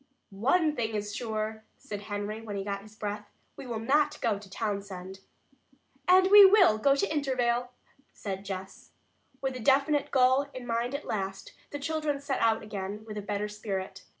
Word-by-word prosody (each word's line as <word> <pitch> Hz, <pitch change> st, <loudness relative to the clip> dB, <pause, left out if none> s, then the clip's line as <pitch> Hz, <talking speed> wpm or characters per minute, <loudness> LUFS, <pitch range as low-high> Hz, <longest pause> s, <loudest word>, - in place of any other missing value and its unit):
"One 300 Hz, -, +2 dB
thing 225 Hz, -3 st, -2 dB
is 205 Hz, 0 st, -3 dB
sure," 220 Hz, -1 st, -3 dB
said 205 Hz, -1 st, -7 dB
Henry, 205 Hz, +1 st, -4 dB
when 215 Hz, -2 st, -6 dB
he 195 Hz, -, -3 dB
got 200 Hz, 0 st, -3 dB
his 215 Hz, +1 st, -15 dB
breath. 210 Hz, -1 st, -5 dB, 0.3 s
"We 265 Hz, -, -9 dB
will 235 Hz, -2 st, -3 dB
not 285 Hz, +7 st, +2 dB
go 215 Hz, -4 st, 0 dB
to 200 Hz, -1 st, -14 dB
Townsend." 195 Hz, -3 st, -4 dB, 0.9 s
"And 375 Hz, +1 st, +6 dB
we 410 Hz, 0 st, +11 dB
will 380 Hz, -, +6 dB
go 275 Hz, +4 st, +4 dB
to 315 Hz, +3 st, 0 dB
Intervale," 250 Hz, -4 st, 0 dB, 0.4 s
said 195 Hz, -1 st, -6 dB
Jess. 190 Hz, -1 st, -8 dB, 0.5 s
With 265 Hz, -1 st, -2 dB
a -, -, -5 dB
definite 280 Hz, +4 st, +2 dB
goal 260 Hz, +1 st, +4 dB
in 255 Hz, -1 st, -7 dB
mind 235 Hz, +2 st, -1 dB
at 280 Hz, -, -5 dB
last, 195 Hz, -2 st, -4 dB, 0.2 s
the 290 Hz, -, -5 dB
children 305 Hz, -1 st, -2 dB
set 280 Hz, -1 st, -2 dB
out 225 Hz, -1 st, +2 dB
again 205 Hz, 0 st, -6 dB
with 215 Hz, -1 st, -7 dB
a -, -, -5 dB
better 205 Hz, +1 st, -2 dB
spirit. 195 Hz, -2 st, -5 dB
220 Hz, 175 wpm, -29 LUFS, 205-275 Hz, 0.9 s, we